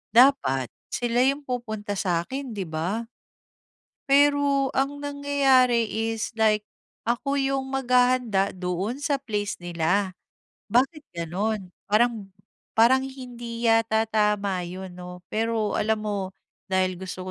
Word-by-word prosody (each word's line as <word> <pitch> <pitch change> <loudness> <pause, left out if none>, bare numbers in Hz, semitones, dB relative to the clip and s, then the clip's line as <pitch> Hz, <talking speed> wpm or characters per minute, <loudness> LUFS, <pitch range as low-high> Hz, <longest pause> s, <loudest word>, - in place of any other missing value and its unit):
dapat 230 - +5 0.2
sila 240 0 +1
yung 275 +2 +1
pupunta 220 -5 -4
sa’kin, 205 +9 -2
'di 195 - -3
ba? 180 +9 -2 1.0
Pero 285 -1 +4
ang 280 +2 0
nangyayari 270 -5 +3
is 225 0 -2
like 215 -1 +3 0.5
ako 275 +4 0
yung 270 0 0
maghahanda 250 -6 +2
doon 185 +8 -3
sa 285 -1 +1
place 210 -6 -3
nila, 175 +3 0 0.6
bakit 270 +7 +1
gano'n? 185 +3 -2 0.2
Parang 215 -1 +2 0.5
parang 235 +4 +6
hindi 240 -3 -7
yata 225 -1 +3
tama 210 -3 +1
'yon 185 +1 -7
'no. 180 0 -10
Pero 225 -1 0
alam 220 0 +1
mo 205 -1 -1 0.5
dahil 185 -1 0
gusto 185 -1 -6
225 Hz, 115 wpm, -25 LUFS, 195-260 Hz, 1.0 s, parang